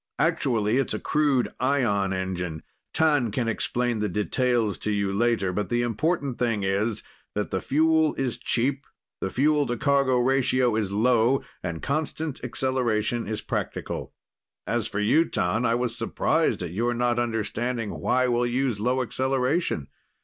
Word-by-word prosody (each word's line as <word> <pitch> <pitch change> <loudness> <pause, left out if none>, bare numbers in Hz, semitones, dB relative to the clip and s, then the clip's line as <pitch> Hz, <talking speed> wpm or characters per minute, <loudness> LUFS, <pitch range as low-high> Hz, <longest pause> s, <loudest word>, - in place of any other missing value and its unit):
Actually, 115 -3 +1
it's 135 - 0
a - - -3
crude 145 -5 +1
ion 120 -8 +1
engine. 90 -4 -3 0.3
T'an 145 -7 +3
can 120 +2 -1
explain 120 +1 -1
the 105 0 0
details 110 +2 0
to - - -2
you 100 -2 0
later, 105 -3 +1
but 100 0 -2
the 120 0 +1
important 140 - -1
thing 115 -5 0
is 100 +3 0 0.3
that 105 0 -2
the 95 - -1
fuel 160 +2 +2
is 130 -3 -2
cheap, 135 +3 0 0.3
the 95 - -2
fuel 145 +5 +2
to 120 - -2
cargo 140 -1 +2
ratio 130 -1 +2
is 105 -3 -1
low 120 +4 +3 0.2
and 85 -3 -5
constant 155 0 -2
acceleration 120 -2 -1
is 110 -1 -3
practical. - - -4 0.5
"As - - -1
for 100 - -3
you, 115 +10 +4
Tan, 105 +7 0
I 115 - +2
was 120 -1 -1
surprised 125 - 0
at 85 - -4
your 120 +6 0
not 120 0 +1
understanding 115 0 -2
why 130 0 +1
we'll 120 0 +1
use 125 -3 0
low 125 +4 +1
acceleration. 130 - 0
120 Hz, 155 wpm, -25 LUFS, 105-130 Hz, 0.5 s, you